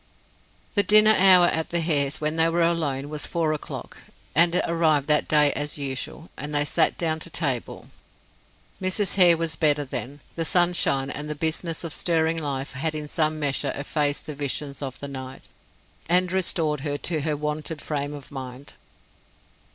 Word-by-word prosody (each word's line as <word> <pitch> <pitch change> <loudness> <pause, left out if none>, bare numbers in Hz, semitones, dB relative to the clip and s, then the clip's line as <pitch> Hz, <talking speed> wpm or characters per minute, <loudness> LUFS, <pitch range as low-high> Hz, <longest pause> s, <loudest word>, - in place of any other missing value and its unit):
The 205 - +4
dinner 215 +1 +7
hour 185 -2 +7
at 160 -2 0
the 170 - 0
Hares', 145 -4 0
when 155 +1 -1
they 165 0 +3
were 170 +1 +1
alone, 150 -5 -1
was 150 0 -3
four 165 -3 -1
o'clock 150 - -7 0.4
and 170 +2 +4
it - - +2
arrived 160 -4 +1
that 150 0 +3
day 150 -2 +4
as 145 +1 -2
usual, 140 +3 -5
and 150 0 -6
they 145 0 +2
sat 160 +2 +2
down 160 -2 -1
to 170 - -5
table. 140 -8 -3 0.9
Mrs. 185 +1 -1
Hare 175 -3 +5
was 165 -1 -2
better 150 -2 +2
then; 135 +2 -6
the 165 - -2
sunshine 175 -5 +2
and 150 +1 -5
the 150 - -3
business 160 +2 -2
of 165 -3 -5
stirring 165 -1 +1
life 140 -3 -4
had 155 +4 -2
in 150 -1 -5
some 155 0 -1
measure 145 -2 -1
effaced 145 0 -1
the 150 - -6
visions 140 0 -3
of 135 -2 -6
the 140 - -6
night, 130 -1 -9 0.7
and 180 +1 +2
restored 165 -5 0
her 145 +1 -3
to 160 0 -1
her 150 0 -1
wonted 150 +1 -4
frame 145 0 -4
of 140 -2 -12
mind. 130 0 -9
155 Hz, 175 wpm, -24 LUFS, 145-165 Hz, 0.9 s, dinner